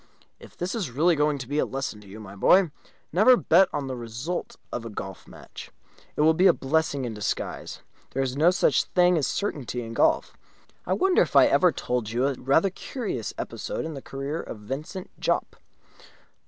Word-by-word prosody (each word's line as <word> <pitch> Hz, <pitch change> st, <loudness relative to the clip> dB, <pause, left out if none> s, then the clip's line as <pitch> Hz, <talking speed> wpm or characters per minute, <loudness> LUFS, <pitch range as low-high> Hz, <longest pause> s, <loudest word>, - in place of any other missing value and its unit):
"If -, -, -15 dB
this 175 Hz, +2 st, -3 dB
is 210 Hz, -, -2 dB
really 160 Hz, +8 st, +2 dB
going 150 Hz, 0 st, +1 dB
to 130 Hz, -3 st, -7 dB
be 145 Hz, +3 st, -1 dB
a -, -, +3 dB
lesson 135 Hz, -6 st, -4 dB
to 100 Hz, -, -16 dB
you, 100 Hz, +3 st, -10 dB
my 100 Hz, -2 st, -10 dB
boy, 180 Hz, -, +4 dB, 0.4 s
never 215 Hz, +9 st, +6 dB
to -, -, +4 dB
bet 185 Hz, -1 st, +5 dB
on 145 Hz, -, -3 dB
the 130 Hz, -1 st, -4 dB
result 120 Hz, +9 st, -5 dB, 0.2 s
of 120 Hz, -, -3 dB
a 115 Hz, -, -6 dB
golf 95 Hz, -3 st, -8 dB
match, -, -, -11 dB, 0.5 s
it -, -, 0 dB
will 160 Hz, +1 st, +5 dB
be 180 Hz, +4 st, +4 dB
a 180 Hz, -, +6 dB
blessing 140 Hz, -1 st, 0 dB
in 115 Hz, -, -4 dB
disguise. 105 Hz, -1 st, -4 dB, 0.3 s
There 135 Hz, -, -1 dB
is 130 Hz, -1 st, -3 dB
no 155 Hz, +5 st, +5 dB
such 185 Hz, -, +3 dB
thing 180 Hz, 0 st, +3 dB
as 155 Hz, -5 st, +1 dB
a -, -, -2 dB
certainty 135 Hz, -, -3 dB
in 115 Hz, 0 st, -7 dB
golf. 320 Hz, -, +2 dB, 0.5 s
I -, -, +1 dB
wonder 375 Hz, 0 st, +3 dB
if -, -, -1 dB
I -, -, +8 dB
ever 180 Hz, -2 st, +4 dB
told 125 Hz, -7 st, -2 dB
you 120 Hz, +3 st, 0 dB
a 140 Hz, -, +1 dB
rather 140 Hz, +9 st, +2 dB
curious 195 Hz, -, -5 dB
episode -, -, -4 dB
in 160 Hz, -, -5 dB
the 135 Hz, -, -7 dB
career 140 Hz, +5 st, -4 dB
of -, -, -8 dB
Vincent 150 Hz, -, -6 dB
Jopp?" -, -, -1 dB
145 Hz, 210 wpm, -26 LUFS, 125-175 Hz, 0.5 s, I